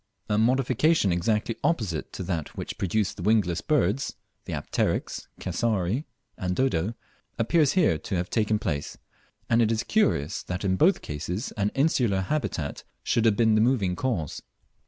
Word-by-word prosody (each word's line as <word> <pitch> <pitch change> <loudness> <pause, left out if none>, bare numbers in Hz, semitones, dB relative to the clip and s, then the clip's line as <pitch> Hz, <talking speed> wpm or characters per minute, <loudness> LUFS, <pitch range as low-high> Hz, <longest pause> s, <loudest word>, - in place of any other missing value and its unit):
A 105 - +2
modification 130 - +3
exactly 105 +6 0
opposite 110 - -1
to - - -5
that 85 -5 -4
which - - -5
produced 100 +2 0
the - - -6
wingless 95 -4 +2
birds 135 - +1 0.3
(the - - -6
Apteryx, - - -2
Cassowary, 100 - -1 0.3
and 90 0 -1
Dodo), 110 -4 0 0.4
appears 145 +5 +3
to 185 -3 +4
have 80 -2 +1
here 90 -2 0
taken 105 +3 0
place; 75 -8 -3 0.5
and 115 - +3
it 115 -1 +3
is 110 -1 0
curious 195 - +1
that 90 +3 -4
in 95 -1 +2
both 180 - +3
cases 85 - -4
an 100 -1 0
insular 125 -9 +2
habitat 95 - -2 0.2
should 115 - +1
have 110 -3 +4
been 110 -2 +4
the 110 - +4
moving 110 -7 +2
cause. 95 - -2
110 Hz, 155 wpm, -26 LUFS, 90-125 Hz, 0.5 s, to